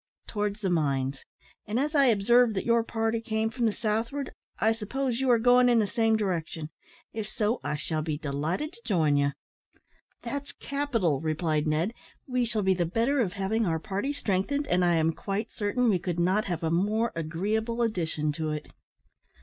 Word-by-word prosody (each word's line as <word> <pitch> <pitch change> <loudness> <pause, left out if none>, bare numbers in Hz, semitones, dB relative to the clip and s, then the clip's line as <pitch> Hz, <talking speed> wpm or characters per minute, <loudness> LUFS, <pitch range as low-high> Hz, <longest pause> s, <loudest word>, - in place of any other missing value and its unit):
"Towards 210 0 -2
the 190 -3 0
mines; 140 -4 0 0.4
and, 215 +4 0
as 295 +3 0
I 280 -2 +5
observed 235 +1 +4
that 190 - -2
your 235 -1 +3
party 225 0 -1
came 220 -1 -1
from 240 -1 0
the - - +2
southward, 230 +6 -2 0.3
I 220 - +3
suppose 240 +3 -2
you 265 - +1
are 240 - +6
going 245 +2 +5
in 240 - +4
the 220 - +4
same 225 +2 +2
direction. 165 -6 -3 0.4
If 220 -1 -4
so, 215 +3 0
I - - -1
shall 155 +1 -2
be 155 -1 -2
delighted 155 - -2
to 465 - -16
join 160 - +2
you." 140 0 +2 0.9
"That's 280 0 -5
capital," 235 - -1
replied 155 -1 0
Ned, 160 +8 +1 0.3
"we 250 -2 0
shall 220 -2 -1
be 190 0 +4
the 180 -1 0
better 230 - +1
of 195 -7 +1
having 200 +3 0
our 165 -1 +1
party 200 - -2
strengthened, 280 +2 -1
and 180 -8 +2
I 175 -1 +3
am 160 0 +2
quite 205 +5 -3
certain 230 +4 0
we 195 -5 +3
could 175 -1 -3
not 185 +5 +2
have 175 -3 -3
a 160 - 0
more 210 +7 +1
agreeable 210 +9 -1
addition 160 -8 -1
to 155 +1 -3
it." 150 0 -4
210 Hz, 190 wpm, -28 LUFS, 165-235 Hz, 0.9 s, are